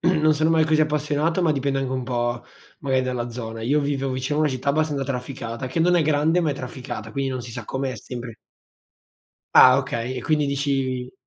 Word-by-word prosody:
non 155 -3 +3
sono 155 +2 +2
mai 160 -1 +4
così 155 0 +2
appassionato, 150 +3 +1
ma 160 -3 +3
dipende 135 -1 -1
anche 130 -1 -2
un 130 -1 -2
po', 120 -1 -2 0.4
magari, 130 -3 +1
dalla 125 -2 -3
zona. 115 -1 -6
Io 145 +6 +2
vivevo 135 -2 -1
vicino 130 +4 -2
a - - +2
una 150 - +2
città 130 +2 -1
abbastanza 150 -2 0
trafficata, 125 -2 -5
che 130 +6 -3
non 180 +2 +4
è 170 - +4
grande, 155 +3 +2
ma 160 -3 +1
è - - -2
trafficata, 125 -4 -7
quindi 135 -1 -1
non 130 -2 -4
si 115 -1 -9
sa 125 - -6
com'è, 135 +2 -3
sempre 120 -2 -7 1.2
Ah, 130 +1 +8
okay. 130 -2 -3
E 125 - -4
quindi 150 0 +1
dici: 135 -3 -1
135 Hz, 210 wpm, -23 LUFS, 125-150 Hz, 1.2 s, Ah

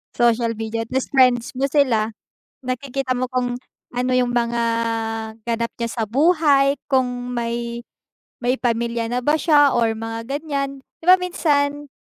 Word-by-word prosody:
Social 235 -1 +2
media, 225 +1 -3
tas 260 +3 -2
friends 250 -2 +3
mo 270 - +1
sila. 255 -6 +2 0.5
Nakikita 255 +1 -2
mo 255 0 -2
kung 250 -1 -1 0.4
ano 250 +1 -1
yung 245 -1 +1
mga 235 0 0 0.8
ganap 235 0 -1
niya 235 - -2 0.2
sa - - +2
buhay, 285 0 +4 0.2
kung 250 -2 0
may 235 0 -3 0.6
may 250 +2 +1
pamilya 235 -1 -1
na 245 +2 -2
ba 300 +4 +2
siya, 290 -2 +5
or 230 -2 +1
mga 225 +1 -6
ganyan 275 -1 -3 0.2
'di - - -14
ba, 365 - +10
minsan, 290 -5 0
250 Hz, 145 wpm, -21 LUFS, 235-275 Hz, 0.8 s, ba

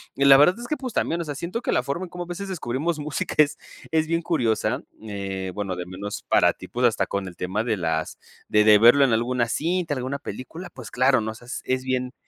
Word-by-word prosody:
Y 140 - +1
la 135 -1 +9
verdad 150 +6 +6
es 240 - -7
que, 305 - -1
pues 255 -3 -6
también, 170 +1 0
o - - -2
sea, 150 -3 -5
siento 170 - -4
que - - 0
la - - +2
forma 170 +7 -3
en - - -13
como 175 0 -6
a - - -17
veces 190 +3 -5
descubrimos 155 -1 -2
música 150 0 -3
es 150 -1 +4 0.3
es 160 -1 +2
bien 165 +1 0
curiosa, 125 -7 0 0.2
eh, 95 -3 -5
bueno 100 -3 -3
de 90 0 -6
menos 100 +3 -6
para - - +4
ti, - - -11
pues, 125 +1 0
hasta 115 - +2
con 100 -1 -3
el 90 - -9
tema 95 +5 -2
de 115 -3 0
las 80 -3 -2 0.3
de 105 0 +4
de 105 -1 +7
verlo 120 +6 +7
en 130 - +1
alguna 120 +1 +1
cinta, 165 +3 -1
alguna 130 +2 -3
película, 140 - -8
pues - - -11
claro, 130 +2 +3
¿no? 110 0 -3
O - - -10
sea 120 - -15 0.2
es 130 0 -1
bien 130 0 -2
130 Hz, 250 wpm, -24 LUFS, 110-160 Hz, 0.3 s, la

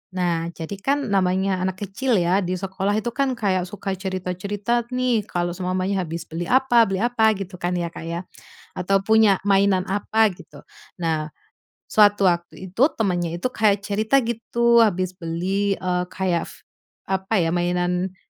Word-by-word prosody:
Nah, 170 -2 0
jadi 170 +4 -6
kan 275 0 -1
namanya 190 0 +1
anak 185 +2 -3
kecil 230 +6 -1
ya, 180 0 +2
di 185 -1 -2
sekolah 195 +2 -2
itu 220 +2 -1
kan 270 0 0
kayak 185 -5 0
suka 195 +1 -5
cerita-cerita 190 +5 -2
nih, 250 -4 0
kalau 175 0 -2
seumpamanya 185 +2 -1
habis 165 +1 -5
beli 165 +1 -5
apa 245 -3 +4
beli 195 +2 -1
apa 225 -3 +3
gitu 190 -2 -7
kan, 175 +1 -1
ya, 170 -1 -2
Kak, 165 - -9
ya. 170 +2 -4 0.5
Atau 195 +2 +1
punya 220 -3 +5
mainan 195 -1 +3
apa 215 +3 +2
gitu. - - -15 0.3
Nah, 160 -2 -1 0.6
suatu 205 -1 +5
waktu 175 +2 -6
itu, 225 - -4
temannya 175 -6 -1
itu 175 - -1
kayak 205 -3 +2
cerita 220 +6 +1
gitu 235 +1 +2
habis 185 -5 +2
beli, 185 +4 -1
eee, 180 -1 -1
kayak 180 -2 -1
f - - -15 0.5
apa 190 +3 -1
ya, 165 - 0
mainan 180 +1 -1
190 Hz, 160 wpm, -22 LUFS, 180-215 Hz, 0.6 s, punya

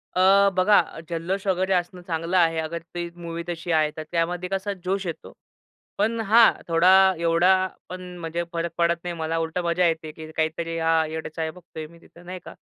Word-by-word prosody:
अ, 195 +2 +5
बघा 205 +3 +5
अ, - - -4
जल्लोष 180 +4 -3
वगैरे 190 +1 +1
असणं 180 0 -1
चांगलं 170 +1 -2
आहे, 165 -2 +3
अगर 165 +1 -4
ती 175 0 -3
मूवी 170 -1 -6
तशी 170 0 -4
आहे 155 -1 +3
तर, 155 - -4
त्यामध्ये 175 +2 -1
कसा 195 +1 -2
जोश 190 +1 -1
येतो. 165 - -6 0.7
पण 225 +3 0
हां, 225 +3 +7 0.2
थोडा, 165 +2 +4 0.3
एवढा 180 +3 +3 0.2
पण 185 0 -7 0.2
म्हणजे 170 +1 -3
फरक 170 0 -2
पडत 170 0 +3
नाही 175 -1 -4
मला 160 0 -2
उलट 160 +1 -3
मजा 170 +1 +2
येते 160 -1 -2
की 155 0 -10
काहीतरी 165 +1 -1
हां, 160 -1 +2
येडे-चाळे 160 0 -4
बघतोय 160 -3 -10
मी 170 +1 -18
तिथं 175 +1 -18
नाही 185 0 -7
का - - -9
170 Hz, 190 wpm, -24 LUFS, 165-185 Hz, 0.7 s, हां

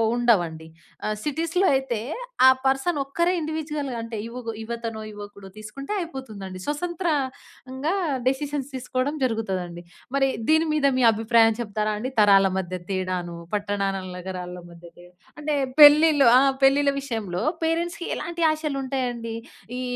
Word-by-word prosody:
ఉండవండి. 175 -10 +1 0.4
ఆహ్, 215 - -1
సిటీస్‌లో 330 - 0
అయితే 265 -4 -1 0.5
ఆ - - +10 0.2
పర్సన్ 270 +5 +1
ఒక్కరే 340 +6 0
ఇండివిడ్యువల్‌గా 300 -4 -3
అంటే 230 -1 -6
యువగ్ 235 0 -7
యువతనో, 230 -1 -5
యువకుడో 205 -1 -10
తీసుకుంటే 215 - -7
అయిపోతుంది 265 - -7
అండి. 185 0 -8
స్వసంత్రంగా 295 -3 -3 0.3
డెసిషన్స్ 280 +1 -1
తీసుకోవడం 260 +3 -2
జరుగుతది 220 -6 -1
అండి. 175 0 -10 0.3
మరి 270 -1 +3 0.2
దీని 315 +1 +4
మీద 300 -2 +1
మీ 255 - +2
అభిప్రాయం 225 0 +3
చెప్తారా 215 -1 -2
అండి? 255 +4 -4
తరాల 200 -2 +6
మధ్య 185 -1 -3
తేడాను, 185 -2 -3 0.2
పట్టణాల, 200 -2 -1
నగరాల 180 -1 -6
మధ్య 170 0 -14
తేడా 175 0 -16 0.3
అంటే 300 0 -1 0.3
పెళ్ళిలో 295 -2 +8
ఆ! - - +7 0.3
పెళ్ళిళ్ళ 280 +1 +4
విషయంలో 220 -9 -3 0.2
పేరెంట్స్‌కి 340 +1 -1
ఎలాంటి 340 +2 -3
ఆశలు 305 -3 -3
ఉంటాయి 260 -1 -1
అండి? 230 -1 -6 0.4
ఈ - - -3
250 Hz, 135 wpm, -24 LUFS, 205-295 Hz, 0.5 s, ఆ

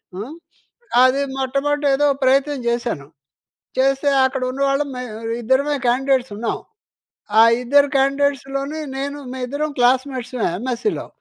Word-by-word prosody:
హ్మ్, 225 +10 -6 0.7
అది 260 +2 +3 0.2
మొట్టమొదట 280 +2 -1
ఏదో 290 +2 +2 0.2
ప్రయత్నం 275 +2 +2
జేశాను. 235 - -2 0.7
చేస్తే 270 +2 +2 0.2
అక్కడున్నవాళ్ళం 275 +2 0
మేవిద్దరమే 240 +4 -1
క్యాండిడేట్స్ 260 -1 +1
ఉన్నాం. 225 +2 -2 0.8
ఆ - - +10 0.2
ఇద్దరు 285 +3 +4
క్యాండిడేట్స్‌లోని 275 +2 0 0.2
నేను, 280 +1 -3 0.2
మేయిద్దరం 285 +4 -3
క్లాస్మేట్స్‌మే 255 -1 +1
ఎమ్‌ఎస్‌సీలో. 255 - -2
265 Hz, 95 wpm, -20 LUFS, 250-280 Hz, 0.8 s, ఆ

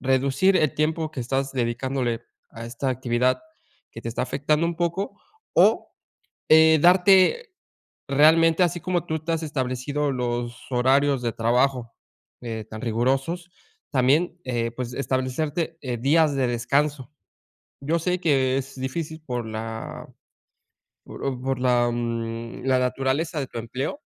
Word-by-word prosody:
reducir 135 +8 +2
el 155 -5 +2
tiempo 155 +1 0
que 135 - -6
estás 135 +3 -2
dedicándole 120 -1 -1 0.3
a 115 0 -9
esta 130 +3 -3
actividad, 125 0 0 0.5
que 115 - -10
te 115 - -4
está 115 - -2
afectando 150 +4 0
un 170 0 -3
poco, 175 +4 -2 0.3
o, - - +4 0.6
eh, 160 0 +7
darte 190 - +5 0.6
realmente 160 +4 +5
así 175 0 0
como 180 0 -1
tú 160 - -1
te 165 - -2
has 165 - -1
establecido 140 0 -2
los 120 -1 -3
horarios 135 +2 +3
de 115 -2 -1
trabajo, 125 +1 +1 0.5
eh, 115 -3 -5
tan 110 0 -8
rigurosos, 135 +9 -1 0.4
también, 145 +7 +2
eh, 120 -2 -1
pues, 125 -1 -5
establecerte, 140 +6 -2
eh, 125 -3 -3
días 145 +3 +3
de 135 -2 +1
descanso, 135 +3 0 0.7
yo 155 +5 0
sé 180 +2 -1
que 135 -5 +2
es 135 0 -7
difícil 160 +4 -4
por 120 -3 -3
la 110 +1 -6 1.0
por 135 -2 -4
por 130 -1 -2
la, 125 -1 +2
mm, 115 -1 -4
la 130 -1 +3
naturaleza 135 +5 -1
de 135 - -3
tu 115 - -6
empleo. 130 - -4
135 Hz, 140 wpm, -24 LUFS, 120-155 Hz, 1.0 s, eh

